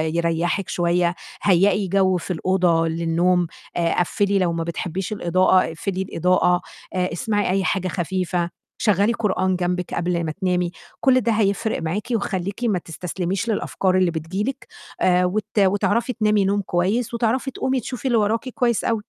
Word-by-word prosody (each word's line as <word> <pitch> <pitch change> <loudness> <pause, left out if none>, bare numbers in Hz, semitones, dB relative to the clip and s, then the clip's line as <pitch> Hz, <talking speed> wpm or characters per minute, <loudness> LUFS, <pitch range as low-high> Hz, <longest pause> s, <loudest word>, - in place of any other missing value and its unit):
يريّحِك 170 +3 0
شوية، 175 0 +1 0.3
هيئي 195 +1 +3
جو 185 0 +2
في 180 - -5
الأوضة 175 -1 +2
للنوم، 170 +2 +1 0.3
آآ، 170 -1 +1
قفّلي 200 +2 +1
لو 175 -2 +1
ما 165 0 -2
بتحبيش 180 +4 -4
الإضاءة، 185 0 +3
اقفلي 185 +3 -3
الإضاءة، 180 -1 +2 0.3
آآ 185 0 0
اسمعي 205 +2 0
أي 190 +1 +1
حاجة 185 0 0
خفيفة، 180 -1 -1 0.3
شغّلي 210 +2 +2
قرآن 190 -4 0
جنبِك 180 0 -2
قبل 170 0 -1
ما 160 - -2
تنامي، 180 +1 -1 0.3
كلّ 255 -1 +4
ده 230 - +1
هيفرِق 215 0 0
معاكِ 170 +7 -3
وخلّيكِ 200 +1 -3
ما 210 -6 +1
تستسلميش 180 +5 -4
للأفكار 190 -3 0
اللي 185 -2 +3
بتيجي 165 +5 -3
لِك، 270 - -8 0.3
آآ 180 0 +4
وت 210 +3 -1
وتعرفي 205 +5 +2
تنامي 210 -2 +2
نوم 200 +1 +1
كويس، 200 +7 0
وتعرفي 235 +4 0
تقومي 260 +1 -1
تشوفي 250 +2 -7
اللي 240 -3 +3
وراكِ 220 +4 0
كويس 240 -2 0
أوي. 225 -2 0
185 Hz, 155 wpm, -22 LUFS, 175-210 Hz, 0.3 s, كلّ